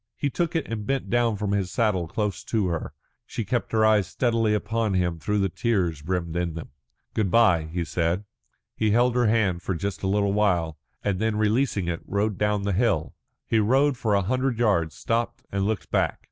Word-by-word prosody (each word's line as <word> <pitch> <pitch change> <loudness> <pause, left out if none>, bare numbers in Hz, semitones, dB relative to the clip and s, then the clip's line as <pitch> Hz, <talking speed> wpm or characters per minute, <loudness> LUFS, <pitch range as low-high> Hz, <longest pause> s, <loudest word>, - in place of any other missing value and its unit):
He 145 - -1
took 170 +1 -1
it 165 - 0
and 105 -2 -5
bent 135 -8 -1
down 120 -2 +2
from 100 0 -2
his 100 -3 0
saddle 95 -4 0
close 105 +3 -2
to 105 -5 0
her. 85 -2 -4 0.3
She 115 - -4
kept 120 +3 -1
her 110 -1 +3
eyes 105 -2 +4
steadily 115 -3 +1
upon 110 -1 -1
him 90 -2 0
though 105 +4 0
the 100 -1 +2
tears 90 -7 -1
brimmed 85 0 -2
in 85 -2 -1
them. 80 - -7 0.4
"Good 105 -4 0
bye," 90 -7 +4
he 85 +2 -3
said. 85 +4 -1 0.5
He 110 - +1
held 120 +3 +3
her 120 -1 +2
hand 105 -6 +2 0.2
just 95 -3 -4
for - - -1
a - - +1
little 100 0 +1
while, 90 -7 +1 0.2
and 100 -3 0
then 110 0 0
releasing 105 -2 +1
it, 85 -1 -2
rode 100 0 -1
down 105 -1 +1
the 100 0 0
hill. 95 -6 +1 0.3
He 115 - +2
rode 135 +6 +3
for 110 -4 0
a 100 - +2
hundred 130 +4 0
yards, 95 -9 +1
stopped 120 +3 -2
and 100 0 0
looked 110 -1 -3
back. - - +1
105 Hz, 205 wpm, -25 LUFS, 90-115 Hz, 0.5 s, eyes